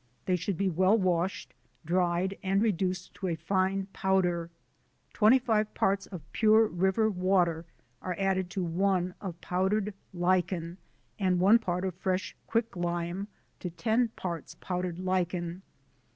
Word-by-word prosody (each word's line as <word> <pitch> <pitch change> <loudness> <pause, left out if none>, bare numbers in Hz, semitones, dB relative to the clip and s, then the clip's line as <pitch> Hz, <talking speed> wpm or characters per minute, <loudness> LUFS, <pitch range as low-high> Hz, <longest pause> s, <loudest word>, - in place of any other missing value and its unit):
They 185 - +2
should 180 +1 -2
be 195 - +1
well 185 +4 +3
washed, 185 -1 -1 0.3
dried, 180 +2 +1
and 195 +1 +1
reduced 185 -4 0
to 190 - -4
a 170 - 0
fine 190 +4 0
powder: 180 -3 +1 0.6
25 220 -2 +3
parts 195 0 +1
of 180 -7 -8
pure 220 0 +5
river 190 +3 +1
water 180 -4 +1 0.4
are 180 -1 -3
added 190 -2 0
to 185 +1 -2
1 180 +1 +1
of 175 -4 -6
powdered 195 +3 0 0.2
lichen 180 -1 0 0.4
and 185 -2 +2
1 205 +6 +6
part 180 -4 -2
of 185 - -2
fresh 185 +2 -2
quick 230 -1 0
lime 175 +2 -2 0.3
to 180 - -4
10 225 +7 +1
parts 170 -4 -5
powdered 180 -2 -3
lichen. 180 -1 -1
185 Hz, 135 wpm, -29 LUFS, 175-195 Hz, 0.6 s, 1